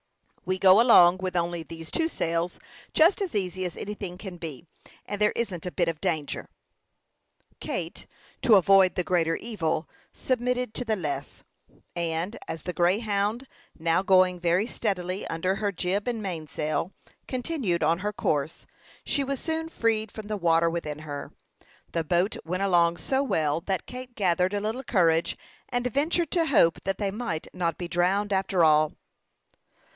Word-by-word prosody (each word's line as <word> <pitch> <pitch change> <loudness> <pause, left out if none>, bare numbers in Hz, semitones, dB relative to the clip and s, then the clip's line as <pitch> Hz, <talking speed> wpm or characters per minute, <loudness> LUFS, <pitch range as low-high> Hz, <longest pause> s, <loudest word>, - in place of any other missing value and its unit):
We 185 0 0
go 190 +3 +7
along 185 -7 +7
with 185 -1 -3
only 170 0 -1
these 165 0 -9
two 325 0 +1
sails 170 - -2 0.3
just 340 +6 +5
as 375 - -3
easy 185 -2 -1
as 180 -2 -4
anything 200 -3 -6
can 190 -2 -8
be, 165 -2 -7 0.4
and 205 0 -5
there 210 - +4
isn't 190 -8 -3
a - - -3
bit 175 -2 0
of 165 -2 -3
danger." 160 -6 -2 1.1
Kate, - - -4 0.3
to 235 -5 +6
avoid 195 -1 +5
the 180 - 0
greater 165 -2 +1
evil, 165 -8 -2 0.2
submitted 250 -2 -1
to 250 - -3
the 225 -2 0
less; 145 -6 -5 0.5
and, 170 +4 -2
as 160 - -6
the 180 - -4
Greyhound, 205 +6 +1 0.3
now 165 +2 +2
going 185 -2 +4
very 175 +4 +2
steadily 195 -5 -2
under 180 +4 -1
her 205 0 -1
jib 190 +3 -1
and 235 -3 -1
mainsail, 155 -3 -3 0.4
continued 250 - -1
on 165 +3 +2
her 205 +2 -2
course, 160 -7 -2 0.4
she 285 - +1
was 275 -1 -3
soon 320 0 -3
freed 220 -6 0
from 215 -2 -8
the 215 - -2
water 170 -3 +3
within 155 -3 -4
her. 145 -2 -7 0.6
The 165 - -1
boat 175 +5 +1
went 180 +4 -2
along 170 -3 +3
so 270 +1 0
well 160 - 0
that 190 +2 -2
Kate 250 -1 -9
gathered 185 -1 +1
a - - +1
little 220 +5 -3
courage, 170 -8 +2 0.3
and 245 0 -1
ventured 310 +6 0
to 335 -3 +2
hope 170 - +4
that 195 0 -1
they 200 -2 -1
might 205 -7 -4
not 170 -2 -1
be 175 - -4
drowned, 190 +4 +1
after 190 -2 +2
all. 155 -1 +4
185 Hz, 165 wpm, -27 LUFS, 170-215 Hz, 1.1 s, go